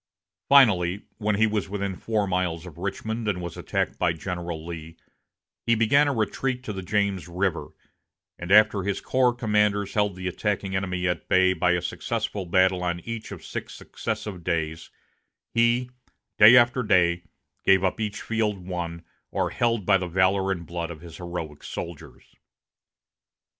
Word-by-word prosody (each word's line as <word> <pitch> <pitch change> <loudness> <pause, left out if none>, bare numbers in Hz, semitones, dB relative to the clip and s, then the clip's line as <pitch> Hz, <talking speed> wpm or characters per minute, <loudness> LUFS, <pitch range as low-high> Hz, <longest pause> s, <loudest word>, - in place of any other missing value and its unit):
Finally, 100 -9 +5 0.2
when 105 -1 +1
he 110 +2 +4
was 105 -2 -1
within 100 -1 -3
four 110 +1 -1
miles 90 -3 -1
of 85 -2 -11
Richmond 110 +4 -3
and 100 -4 0
was 85 -2 -6
attacked - - -2
by 85 -2 +2
General 85 -1 -5
Lee, 80 -1 -8 0.7
he 115 - +4
began 125 +7 +4
a - - +2
retreat 125 +2 -1
to 105 - -5
the 95 - -5
James 100 -2 -1
River, 90 +1 -1 0.7
and 85 +1 -5
after 105 -1 +6
his 100 +1 -2
corps 130 -1 +2
commanders 105 -4 +1
held 105 -2 +1
the 95 0 -5
attacking 95 0 -2
enemy 95 -1 -1
at 90 - -3
bay 95 0 +4
by 90 -1 +2
a 90 - -1
successful 95 -3 -3
battle 95 +1 +3
on 85 -1 -1
each 115 +1 -6
of - - -9
six - - -6
successive 95 -5 -5
days, 80 -2 -2 0.6
he 120 +2 +2 0.5
day 110 +4 +10
after 120 +1 +4
day 90 -6 +3 0.4
gave 95 -1 +4
up 95 +3 0
each 105 -1 -3
field 110 -3 0
won 85 -2 -5 0.2
or - - -1
held 115 -4 0
by 95 0 +5
the 90 - -3
valor 95 +2 +2
and 85 -3 -3
blood 85 +1 -4
of 80 -2 -9
his 85 -2 -11
heroic 85 -4 -6
soldiers. 85 -3 -8
95 Hz, 165 wpm, -25 LUFS, 90-105 Hz, 0.7 s, day